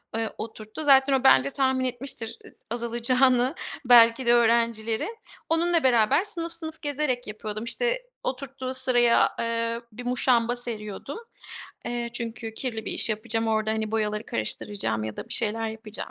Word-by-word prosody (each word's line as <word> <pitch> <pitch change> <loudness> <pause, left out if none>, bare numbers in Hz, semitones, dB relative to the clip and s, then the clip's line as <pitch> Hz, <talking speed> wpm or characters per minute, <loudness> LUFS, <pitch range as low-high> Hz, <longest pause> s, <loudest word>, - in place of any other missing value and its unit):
eee, 225 -1 -1
oturttu. 220 +5 -7
Zaten 275 -1 +5
o 265 - +2
bence 140 - +6
tahmin 260 - +1
etmiştir 245 -2 -5
ıs - - -17
azalacağını 240 +2 +2 0.3
belki 235 +1 +6
de 240 - +6
öğrencilerin. 230 - +1 0.3
Onunla 335 0 +2
beraber 240 - +4
sınıf 335 -5 -2
sınıf 320 -1 -4
gezerek 285 -5 -2
yapıyordum. 215 0 -5
İşte, - - -1 0.2
oturttuğu 265 0 -4
sıraya, 245 -2 +4
eee, 230 0 -1
bir 245 +3 -9
muşamba 245 -1 +2
seriyordum. 230 - -3 0.7
Eee, 240 -1 -3
çünkü 230 -1 -5
kirli 225 -3 -4
bir - - -3
iş - - +1
yapacağım, 225 +1 -1
orada, 220 0 +1
hani, 220 -1 -2
boyaları 210 -1 -1
karıştıracağım 110 - -2
ya 110 -1 -6
da - - -7
bir - - -7
şeyler 225 0 -1
yapacağım 220 -1 -6
235 Hz, 150 wpm, -26 LUFS, 220-260 Hz, 0.7 s, bence